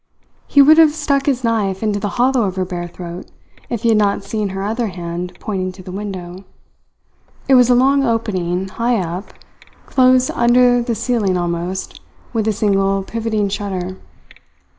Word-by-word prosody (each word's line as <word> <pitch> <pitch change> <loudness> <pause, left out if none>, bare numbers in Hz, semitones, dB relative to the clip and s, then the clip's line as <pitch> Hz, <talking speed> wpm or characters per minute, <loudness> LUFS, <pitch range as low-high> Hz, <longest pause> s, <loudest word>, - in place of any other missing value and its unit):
He 285 - +6
would 310 +3 +6
have 310 -2 +5
stuck 285 -3 0
his 260 -3 0
knife 210 -4 0
into 210 -2 0
the 205 0 -2
hollow 250 -1 +2
of 190 -2 -3
her 185 -1 -1
bare 175 -1 -5
throat 175 0 -9 0.4
if 235 -1 -4
he 230 - +3
had 220 -1 +4
not 200 -1 +1
seen 210 0 -3
her 195 +1 -4
other 225 +3 -1
hand 175 -1 -6
pointing 185 -3 -3
to 185 0 -13
the 185 - -9
window. 190 -2 -6 1.0
It 270 - +4
was 250 -1 +6
a 250 - +5
long 275 +3 +3
opening, 190 -7 -1
high 235 +5 0
up, 180 +1 -4 0.5
close 255 -1 +3
under 245 +1 +4
the 235 -1 -2
ceiling 210 -6 0
almost, 175 +2 -4 0.3
with 220 -2 0
a - - +3
single 195 -2 +1
pivoting 220 -1 -2
shutter. 190 -2 -4
205 Hz, 170 wpm, -18 LUFS, 185-240 Hz, 1.0 s, He